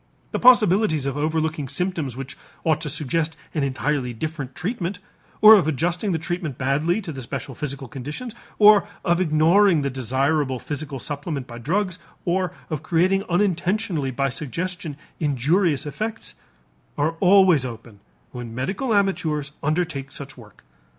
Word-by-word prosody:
The -, -, -1 dB
possibilities 210 Hz, -, +5 dB
of 140 Hz, -1 st, -2 dB
overlooking 155 Hz, -1 st, -1 dB
symptoms 150 Hz, -4 st, -2 dB
which 135 Hz, -1 st, -7 dB, 0.3 s
ought 155 Hz, -1 st, +1 dB
to 155 Hz, -, -3 dB
suggest 155 Hz, +2 st, -2 dB, 0.2 s
an 155 Hz, -, 0 dB
entirely 135 Hz, -1 st, -1 dB
different 145 Hz, -1 st, -5 dB
treatment, 190 Hz, -1 st, -3 dB, 0.4 s
or 215 Hz, +1 st, +11 dB
of 195 Hz, -8 st, +5 dB
adjusting 175 Hz, -, 0 dB
the 165 Hz, -, +1 dB
treatment 165 Hz, -4 st, -4 dB
badly 150 Hz, +9 st, +1 dB
to 175 Hz, -, -6 dB
the 135 Hz, -3 st, -7 dB
special 130 Hz, +1 st, -5 dB
physical 140 Hz, -2 st, -5 dB
conditions, 150 Hz, -, -6 dB, 0.2 s
or 210 Hz, -1 st, +7 dB, 0.2 s
of 175 Hz, 0 st, +2 dB
ignoring 165 Hz, +1 st, +4 dB
the 140 Hz, -, -1 dB
desirable 130 Hz, +2 st, 0 dB
physical 145 Hz, +1 st, -5 dB
supplement 145 Hz, 0 st, -4 dB
by 120 Hz, -2 st, -9 dB
drugs, 185 Hz, -, -1 dB, 0.3 s
or 180 Hz, 0 st, 0 dB, 0.2 s
of 155 Hz, -2 st, -2 dB
creating 185 Hz, +5 st, +2 dB
unintentionally 180 Hz, -3 st, 0 dB
by 135 Hz, +2 st, 0 dB
suggestion 165 Hz, +2 st, -4 dB, 0.2 s
injurious 150 Hz, +3 st, +1 dB
effects, 215 Hz, +10 st, -5 dB, 0.6 s
are 150 Hz, +3 st, +2 dB
always 185 Hz, -6 st, +5 dB
open 115 Hz, -4 st, -8 dB, 0.3 s
when 120 Hz, -2 st, -7 dB
medical 200 Hz, -, -1 dB
amateurs 155 Hz, -8 st, 0 dB
undertake 155 Hz, -3 st, -1 dB
such 135 Hz, -1 st, -8 dB
work. 105 Hz, -5 st, -16 dB
155 Hz, 145 wpm, -23 LUFS, 135-180 Hz, 0.6 s, or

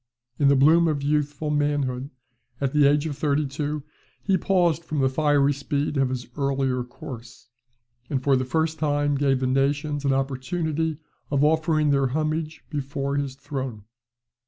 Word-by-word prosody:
In 145 Hz, -, +4 dB
the 140 Hz, -, +5 dB
bloom 160 Hz, +5 st, +5 dB
of 145 Hz, -3 st, -1 dB
youthful 150 Hz, +1 st, 0 dB
manhood, 145 Hz, -3 st, 0 dB, 0.5 s
at 140 Hz, 0 st, -1 dB
the 150 Hz, -2 st, +5 dB
age 145 Hz, +1 st, +2 dB
of 150 Hz, -3 st, -3 dB
thirty 145 Hz, +1 st, +1 dB
two, 145 Hz, +1 st, -3 dB, 0.4 s
he 195 Hz, -, +2 dB
paused 175 Hz, -3 st, +2 dB
from 155 Hz, -2 st, -4 dB
the 135 Hz, -1 st, +3 dB
fiery 145 Hz, 0 st, +3 dB
speed 140 Hz, +2 st, -2 dB
of 135 Hz, -2 st, +2 dB
his 125 Hz, -1 st, -4 dB
earlier 135 Hz, -3 st, 0 dB
course; 120 Hz, -2 st, -11 dB, 0.6 s
and 135 Hz, -2 st, -1 dB
for 140 Hz, -1 st, +4 dB
the 130 Hz, -, +1 dB
first 160 Hz, +4 st, -1 dB
time 145 Hz, -1 st, +1 dB
gave 135 Hz, -2 st, +1 dB
the -, -, +1 dB
nations 145 Hz, +3 st, 0 dB
an 140 Hz, -, +2 dB
opportunity 150 Hz, +4 st, -1 dB, 0.3 s
of 140 Hz, -1 st, +1 dB
offering 155 Hz, -1 st, +2 dB
their 140 Hz, -1 st, +3 dB
homage 155 Hz, +3 st, -2 dB
before 140 Hz, -1 st, -2 dB
his 140 Hz, -2 st, -2 dB
throne. 135 Hz, -6 st, -5 dB
145 Hz, 160 wpm, -24 LUFS, 135-150 Hz, 0.6 s, the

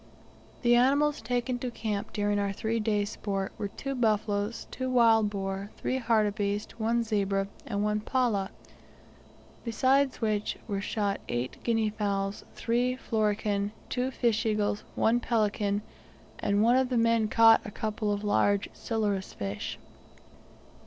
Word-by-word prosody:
The 240 Hz, 0 st, +5 dB
animals 280 Hz, +4 st, +3 dB
taken 245 Hz, +2 st, -1 dB
to 250 Hz, -, -3 dB
camp 215 Hz, -3 st, -3 dB
during 205 Hz, -1 st, 0 dB
our 200 Hz, -1 st, 0 dB
three 225 Hz, +3 st, -1 dB
days' 210 Hz, -1 st, 0 dB
sport 195 Hz, -2 st, -3 dB
were 205 Hz, -, -1 dB
two 275 Hz, +7 st, -5 dB
buffaloes, 215 Hz, -2 st, 0 dB
two 260 Hz, 0 st, -3 dB
wild 225 Hz, -4 st, +5 dB
boar, 195 Hz, 0 st, -4 dB
three 260 Hz, -, -1 dB
hartebeest, 210 Hz, -2 st, 0 dB
one 230 Hz, +2 st, +1 dB
zebra, 195 Hz, -3 st, 0 dB, 0.2 s
and 205 Hz, -3 st, -1 dB
one 210 Hz, 0 st, +1 dB
pallah; 215 Hz, -4 st, 0 dB, 1.1 s
besides 265 Hz, +3 st, +2 dB
which, 215 Hz, -2 st, -1 dB
were 200 Hz, -3 st, -2 dB
shot 200 Hz, -1 st, -1 dB
eight 120 Hz, +2 st, -2 dB
guinea 225 Hz, -2 st, +1 dB
fowls, 200 Hz, -2 st, -2 dB
three 240 Hz, +2 st, 0 dB
florican, 210 Hz, -3 st, 0 dB, 0.2 s
two 255 Hz, +1 st, -1 dB
fish 235 Hz, -3 st, +1 dB
eagles, 210 Hz, -2 st, 0 dB
one 230 Hz, +2 st, +3 dB
pelican, 210 Hz, -3 st, 0 dB, 0.6 s
and 205 Hz, +1 st, +2 dB
one 240 Hz, +3 st, +5 dB
of 260 Hz, -1 st, +2 dB
the 250 Hz, -, 0 dB
men 230 Hz, -1 st, +3 dB
caught 225 Hz, +1 st, +6 dB
a -, -, -6 dB
couple 210 Hz, 0 st, -2 dB
of 205 Hz, 0 st, -2 dB
large 205 Hz, -1 st, +2 dB
silurus 205 Hz, -4 st, -2 dB
fish. 100 Hz, 0 st, -4 dB
215 Hz, 140 wpm, -29 LUFS, 205-235 Hz, 1.1 s, caught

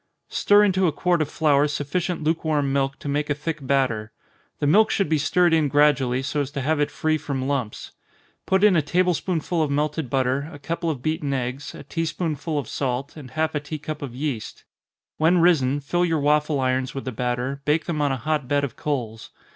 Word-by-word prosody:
_ -, -, -18 dB
Stir 205 Hz, 0 st, +5 dB
into 190 Hz, -2 st, +3 dB
a -, -, +2 dB
quart 175 Hz, +3 st, +1 dB
of 150 Hz, -, -1 dB
flour 150 Hz, -2 st, +3 dB
sufficient 150 Hz, +4 st, -2 dB
lukewarm 155 Hz, -3 st, 0 dB
milk 135 Hz, 0 st, 0 dB
to -, -, -9 dB
make 145 Hz, +1 st, -1 dB
a 145 Hz, -, +1 dB
thick 160 Hz, +2 st, -4 dB
batter. 130 Hz, -5 st, 0 dB, 0.5 s
The -, -, -2 dB
milk 205 Hz, +10 st, +5 dB
should 195 Hz, -, +1 dB
be 155 Hz, -2 st, +2 dB
stirred 175 Hz, +3 st, +3 dB
in 160 Hz, -2 st, +3 dB
gradually, 140 Hz, -3 st, +3 dB
so 145 Hz, +2 st, -1 dB
as 135 Hz, -, -3 dB
to 140 Hz, -, -2 dB
have 155 Hz, +3 st, 0 dB
it 145 Hz, -, +1 dB
free 155 Hz, 0 st, 0 dB
from 135 Hz, -3 st, -3 dB
lumps. 130 Hz, -7 st, -3 dB, 0.6 s
Put 190 Hz, +1 st, +2 dB
in 210 Hz, -3 st, +6 dB
a 160 Hz, -, +4 dB
table 180 Hz, +5 st, +2 dB
spoonful 170 Hz, 0 st, -1 dB
of 155 Hz, -, +1 dB
melted 150 Hz, 0 st, -1 dB
butter, 135 Hz, +3 st, 0 dB
a 145 Hz, -, -9 dB
couple 165 Hz, +3 st, -3 dB
of 135 Hz, -5 st, -4 dB
beaten 155 Hz, -3 st, -1 dB
eggs, 130 Hz, +5 st, -4 dB
a -, -, -9 dB
tea 165 Hz, 0 st, -3 dB
spoonsful 160 Hz, -2 st, -2 dB
of 140 Hz, -6 st, -2 dB
salt, 135 Hz, +1 st, -3 dB
and 145 Hz, -5 st, -10 dB
half 160 Hz, +2 st, -1 dB
a 150 Hz, -, 0 dB
tea 150 Hz, +2 st, -6 dB
cup 150 Hz, 0 st, -6 dB
of 130 Hz, -4 st, -6 dB
yeast. 135 Hz, -5 st, -4 dB, 0.5 s
When 165 Hz, +3 st, +4 dB
risen, 150 Hz, -6 st, +3 dB
fill 175 Hz, +5 st, 0 dB
your 165 Hz, -2 st, +1 dB
waffle 150 Hz, 0 st, +2 dB
irons 130 Hz, 0 st, 0 dB
with 135 Hz, -, -5 dB
the 130 Hz, -, -3 dB
batter, 125 Hz, +3 st, -2 dB
bake 150 Hz, +2 st, +1 dB
them 160 Hz, -4 st, -2 dB
on 145 Hz, -1 st, +2 dB
a 135 Hz, -, -1 dB
hot 150 Hz, 0 st, -1 dB
bed 145 Hz, +1 st, +1 dB
of 135 Hz, -5 st, -3 dB
coals. 115 Hz, -7 st, -4 dB
145 Hz, 220 wpm, -23 LUFS, 135-160 Hz, 0.6 s, in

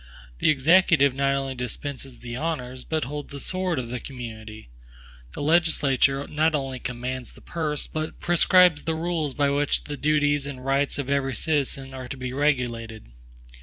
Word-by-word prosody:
The -, -, +3 dB
Executive 155 Hz, -1 st, +5 dB
not 140 Hz, 0 st, +1 dB
only 135 Hz, -1 st, -2 dB
dispenses 130 Hz, +1 st, -6 dB
the 120 Hz, -1 st, -6 dB
honors, 130 Hz, -4 st, -3 dB
but 155 Hz, -2 st, -1 dB
holds 145 Hz, +3 st, -6 dB
the 140 Hz, -, -6 dB
sword 185 Hz, +1 st, -2 dB
of 120 Hz, -2 st, -3 dB
the 125 Hz, +1 st, -3 dB
community. 110 Hz, -, -9 dB, 0.6 s
The -, -, -5 dB
legislature 145 Hz, -4 st, +3 dB
not 155 Hz, +1 st, +1 dB
only 135 Hz, -3 st, -3 dB
commands 125 Hz, 0 st, -5 dB
the -, -, -16 dB
purse, 155 Hz, -3 st, -2 dB
but 155 Hz, 0 st, -5 dB
prescribes 175 Hz, -2 st, +5 dB
the 160 Hz, 0 st, 0 dB
rules 160 Hz, -4 st, -2 dB
by 140 Hz, -1 st, +2 dB
which 145 Hz, +1 st, +1 dB
the 145 Hz, 0 st, -6 dB
duties 145 Hz, -1 st, +2 dB
and 130 Hz, -2 st, -7 dB
rights 135 Hz, +1 st, +1 dB
of 140 Hz, -2 st, -3 dB
every 140 Hz, -2 st, 0 dB
citizen 135 Hz, -2 st, -1 dB
are 130 Hz, -1 st, -7 dB
to 140 Hz, -, -6 dB
be 125 Hz, -1 st, -5 dB
regulated. 120 Hz, -, -1 dB
140 Hz, 165 wpm, -25 LUFS, 130-150 Hz, 0.6 s, Executive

